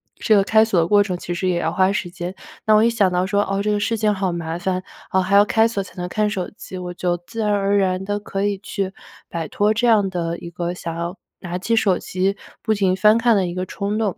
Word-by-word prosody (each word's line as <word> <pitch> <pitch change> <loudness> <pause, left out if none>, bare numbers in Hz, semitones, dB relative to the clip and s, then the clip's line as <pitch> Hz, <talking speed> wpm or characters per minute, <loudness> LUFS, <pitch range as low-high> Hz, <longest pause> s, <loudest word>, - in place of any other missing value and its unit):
这 220 - +1
个 200 - +5
开 220 +1 +5
锁 220 -5 +1
的 165 - +2
过 205 +2 +5
程 185 -3 -3
其 175 - -5
实 185 +1 -1
也 175 -1 +1
要 165 0 -1
花 190 0 +3
时 200 -3 -2
间， 180 0 -6 0.3
那 215 - +4
我 215 - +6
一 - - +4
想 210 -5 +2
到 180 +1 +1
说： 200 +1 +1
“啊， 195 0 -1
这 210 - -1
个 210 - +1
事 225 +2 0
情 215 -1 +2
好 190 -2 -1
麻 165 -1 -4
烦， 185 +1 -1 0.3
啊， 190 - +2
还 190 +2 +1
要 200 - +8
开 220 +2 +3
锁 205 -4 -2
才 185 - -15
能 180 - -3
看 210 +3 0
手 190 -3 -3
机。” 185 - -9
我 180 -1 -5
就 175 0 -1
自 225 - -5
然 210 - +1
而 200 0 +1
然 190 -1 0
地 205 +1 -1
可 195 -1 -3
以 205 -1 0
去 195 -1 -4 0.4
摆 165 -2 -4
脱 210 +1 +2
这 235 +3 +1
样 210 -4 +4
的 170 -2 -3
一 170 - -8
个 175 0 -3
想 170 -2 -6
要 170 +3 -4 0.2
拿 175 -1 -4
起 225 +5 0
手 195 -5 +3
机 190 +2 -1 0.3
不 220 - +1
停 195 -3 +1
翻 210 +3 +5
看 230 -1 +3
的 195 -2 +2
一 175 - -4
个 185 +1 -3
冲 200 +3 -3
动， 210 -5 -1
195 Hz, 295 characters per minute, -21 LUFS, 180-210 Hz, 0.4 s, 要